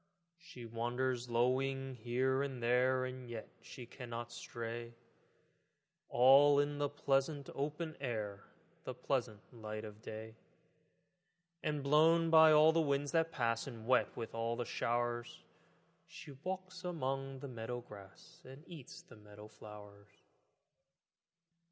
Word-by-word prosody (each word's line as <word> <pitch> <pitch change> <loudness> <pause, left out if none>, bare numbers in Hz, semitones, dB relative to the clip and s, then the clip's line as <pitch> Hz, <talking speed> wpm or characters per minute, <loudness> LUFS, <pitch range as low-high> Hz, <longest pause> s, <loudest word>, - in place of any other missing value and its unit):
She 165 -9 -11
wanders 120 +2 -2
lowing 130 +3 +1
here 130 +3 0
and 135 -4 -4
there, 130 +2 +3
And 130 -1 -7
yet 115 -2 -6
she 125 - -10
cannot 120 -1 -7
stray, 115 0 -6 1.1
All 140 +3 +7
in 145 0 0
the 145 0 +1
pleasant 140 0 0
open 155 +3 -3
air, 105 -6 -4 0.4
The - - -5
pleasant 105 -1 -2
light 110 -1 -6
of 105 0 -11
day; 110 0 -8 1.2
And 150 -2 -2
blown 165 +3 +4
by 160 -1 +8
all 155 +1 +7
the 165 0 +3
winds 140 -1 0
that 165 -1 +2
pass 115 -5 0
And 115 -4 -8
wet 125 +1 +2
with 115 - -5
all 115 +1 -1
the 120 - -3
showers, 120 0 -2 0.6
She 145 - -11
walks 185 +6 -6
among 135 -6 -3
the 140 - -5
meadow 120 0 -5
grass 100 -5 -14
And 135 +3 -12
eats 160 -8 -11
the - - -16
meadow 105 0 -13
flowers. 105 -1 -13
125 Hz, 130 wpm, -36 LUFS, 115-145 Hz, 1.2 s, by